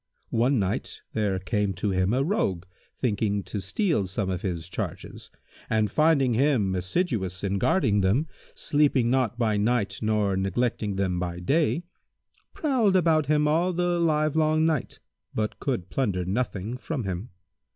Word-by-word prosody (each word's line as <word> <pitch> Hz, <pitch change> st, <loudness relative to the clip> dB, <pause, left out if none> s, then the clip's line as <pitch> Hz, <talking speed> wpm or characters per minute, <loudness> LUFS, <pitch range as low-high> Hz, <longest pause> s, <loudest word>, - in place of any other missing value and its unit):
One 125 Hz, +4 st, +2 dB
night, 95 Hz, -3 st, -2 dB
there 105 Hz, -3 st, 0 dB
came 100 Hz, +2 st, -1 dB
to 100 Hz, +3 st, -2 dB
him 95 Hz, +1 st, +1 dB
a 130 Hz, +3 st, +2 dB
Rogue 100 Hz, -, 0 dB, 0.3 s
thinking 105 Hz, -4 st, 0 dB
to 95 Hz, +3 st, -5 dB
steal 160 Hz, -, 0 dB
some 95 Hz, 0 st, -2 dB
of 90 Hz, -1 st, -3 dB
his 85 Hz, -3 st, -3 dB
charges -, -, -6 dB, 0.4 s
and, 110 Hz, -2 st, +1 dB
finding 150 Hz, -4 st, +3 dB
him 120 Hz, -6 st, +2 dB
assiduous 95 Hz, -, -1 dB
in 100 Hz, 0 st, 0 dB
guarding 110 Hz, -, +2 dB
them, 110 Hz, +12 st, +2 dB, 0.3 s
sleeping 140 Hz, -5 st, +2 dB
not 125 Hz, -3 st, +1 dB
by 110 Hz, -3 st, +1 dB
night 105 Hz, -2 st, 0 dB
nor 105 Hz, -3 st, +1 dB
neglecting 100 Hz, +2 st, -1 dB
them 95 Hz, -2 st, 0 dB
by 90 Hz, -1 st, -3 dB
day, 155 Hz, -, +1 dB, 0.7 s
prowled 245 Hz, -10 st, +2 dB
about 160 Hz, -5 st, +3 dB
him 150 Hz, 0 st, +3 dB
all 170 Hz, +4 st, +2 dB
the 175 Hz, 0 st, 0 dB
livelong 155 Hz, -1 st, +2 dB
night, 155 Hz, -5 st, -1 dB, 0.4 s
but 110 Hz, 0 st, -2 dB
could 115 Hz, -10 st, -3 dB
plunder 100 Hz, -9 st, 0 dB
nothing 110 Hz, +2 st, -2 dB
from 140 Hz, -3 st, -3 dB
him. 95 Hz, +3 st, -4 dB
110 Hz, 150 wpm, -26 LUFS, 95-150 Hz, 0.7 s, finding